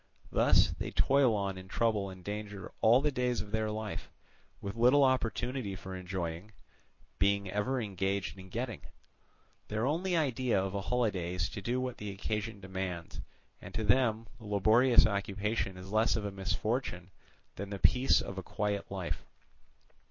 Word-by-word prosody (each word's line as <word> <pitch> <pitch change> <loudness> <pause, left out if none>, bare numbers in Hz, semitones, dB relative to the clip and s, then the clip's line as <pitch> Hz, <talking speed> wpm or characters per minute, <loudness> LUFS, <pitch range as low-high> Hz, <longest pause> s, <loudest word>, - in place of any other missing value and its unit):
Thus - - +5
they - - -2
toil 135 -4 +4
on 100 -2 -2
in 95 - -11
trouble 105 -2 +1
and 95 -1 -11
danger 105 -1 -5
all 115 +4 +6
the 150 +1 +1
days 125 -2 0
of 100 - -6
their 110 0 0
life, 105 -1 -4 0.5
with 100 +1 -5
little 125 +5 +5
opportunity 125 -3 0
for 95 0 -7
enjoying, 90 +1 -4 0.7
being 100 -1 +2
ever 105 +6 0
engaged 100 -2 -2
in 95 0 -11
getting: 120 +4 -4 0.9
their 110 +2 -1
only 170 +5 +1
idea 130 -7 +1
of 95 0 -2
a 100 - -1
holiday 95 -6 0
is 90 -1 0
to 100 - -6
do 120 +6 -1
what 130 -1 -3
the 105 - -4
occasion 105 +2 -3
demands, 95 -3 -5 0.4
and - - -10
to 110 - -1
them 115 0 +3
laborious 110 +4 +5
occupation 100 -1 -1
is 95 +1 -9
less 110 +1 +3
of 110 - -2
a 100 - -2
misfortune 95 -1 -2 0.4
than 100 +1 -5
the 100 - -4
peace 125 +6 +4
of 95 -1 -5
a - - -6
quiet 100 +2 -2
life. 95 -3 -4
105 Hz, 160 wpm, -32 LUFS, 95-120 Hz, 0.9 s, all